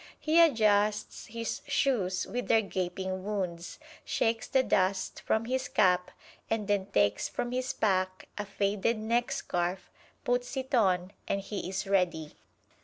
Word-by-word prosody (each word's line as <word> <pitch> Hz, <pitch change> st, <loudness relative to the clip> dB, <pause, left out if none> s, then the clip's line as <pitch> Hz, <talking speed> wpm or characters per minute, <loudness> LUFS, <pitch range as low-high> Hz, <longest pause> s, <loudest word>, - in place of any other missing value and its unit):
He 320 Hz, +2 st, +4 dB
adjusts 215 Hz, -8 st, +2 dB
his 230 Hz, +4 st, -4 dB
shoes 190 Hz, -9 st, +1 dB
with 245 Hz, +5 st, -4 dB
their 225 Hz, -, +4 dB
gaping 185 Hz, 0 st, -3 dB
wounds, 185 Hz, -4 st, -3 dB, 0.3 s
shakes 225 Hz, 0 st, 0 dB
the 265 Hz, -, +3 dB
dust 190 Hz, -4 st, 0 dB
from 220 Hz, +1 st, 0 dB
his 260 Hz, +2 st, -1 dB
cap, 180 Hz, -3 st, +3 dB, 0.4 s
and 225 Hz, -2 st, -1 dB
then 200 Hz, -2 st, +1 dB
takes 105 Hz, -, +1 dB
from 240 Hz, -, -3 dB
his 255 Hz, +1 st, -1 dB
pack 185 Hz, -3 st, 0 dB
a 210 Hz, -, -4 dB
faded 205 Hz, +3 st, 0 dB
neckscarf, 205 Hz, -5 st, -1 dB, 0.3 s
puts 245 Hz, +2 st, -1 dB
it 265 Hz, +1 st, -4 dB
on 185 Hz, -5 st, +2 dB
and 200 Hz, -, 0 dB
he 195 Hz, -2 st, -5 dB
is 190 Hz, +1 st, -3 dB
ready. 180 Hz, -6 st, 0 dB
205 Hz, 140 wpm, -30 LUFS, 185-230 Hz, 0.4 s, He